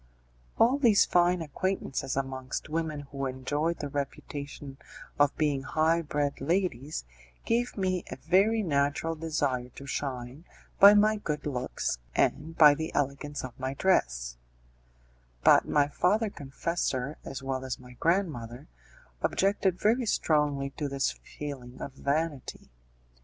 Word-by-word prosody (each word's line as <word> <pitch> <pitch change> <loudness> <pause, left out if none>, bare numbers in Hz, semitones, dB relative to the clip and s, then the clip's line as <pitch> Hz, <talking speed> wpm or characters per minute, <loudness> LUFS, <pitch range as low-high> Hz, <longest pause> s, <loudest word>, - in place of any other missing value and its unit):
All 255 +5 +4
these 230 -7 +5
fine 175 0 +3
acquaintances 150 -4 -2
amongst 135 +1 -4
women 155 -2 -2
who 140 -1 -2
enjoyed 145 +6 -1
the 145 - -4
reputation 140 0 -6 0.4
of 145 -1 +3
being 145 -3 +1
high 160 +4 +1
bred 145 -3 -2
ladies, 155 - -1 0.4
gave 240 +1 0
me 185 -2 0
a - - -5
very 195 +10 +2
natural 145 0 0
desire 150 -6 -1
to 140 - -9
shine 130 0 -4 0.4
by 200 +1 +10
my 215 +1 +4
good 150 -7 -4
looks 125 - -2 0.2
and 165 +2 0
by 150 -2 +9
the 160 +2 -4
elegance 145 +1 -2
of 130 -1 -8
my 130 +1 -3
dress; - - +1 1.1
but - - +6
my 145 -1 +3
father 205 +8 +1
confessor, 140 -2 -3
as 135 0 -7
well 135 -1 -2
as 130 -2 -3
my 125 0 -14
grandmother, 155 - -1 0.6
objected 195 -2 +1
very 230 +3 +2
strongly 145 -6 +1
to 145 0 -4
this 135 -1 0
feeling 130 -4 -8
of 140 - -6
vanity. 145 - -3
145 Hz, 130 wpm, -29 LUFS, 135-170 Hz, 1.1 s, by